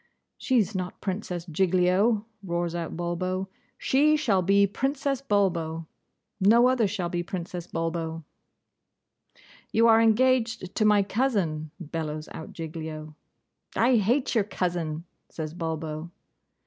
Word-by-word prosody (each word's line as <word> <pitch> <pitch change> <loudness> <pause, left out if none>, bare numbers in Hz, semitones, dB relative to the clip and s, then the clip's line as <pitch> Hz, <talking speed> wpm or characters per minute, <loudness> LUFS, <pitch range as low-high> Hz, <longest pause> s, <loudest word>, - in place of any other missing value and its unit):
'She's 230 -5 +2
not 185 -1 -4
Princess 185 -3 -4
Giglio!' 185 +5 +2 0.2
roars 170 -2 -2
out 170 -1 -4
Bulbo. 185 +2 -2 0.3
'She 300 +3 +3
shall 205 -10 +2
be 200 +2 +4
Princess 270 +5 -1
Bulbo, 170 -9 0 0.5
no 230 +5 +6
other 250 -4 +3
shall 190 -3 -2
be 175 0 -2
Princess 175 0 -5
Bulbo.' 165 -1 -3 1.5
'You 230 +1 +4
are 225 0 +6
engaged 230 -3 +2
to 215 - +1
my 210 -1 +5
cousin!' 195 - 0
bellows 155 -2 -4
out 160 - -8
Giglio. 155 -1 -6 0.6
'I 245 +2 +4
hate 240 +6 +1
your 225 -4 +3
cousin,' 175 -5 -2 0.3
says 155 -1 -5
Bulbo. 160 -1 -4
185 Hz, 120 wpm, -27 LUFS, 165-220 Hz, 1.5 s, no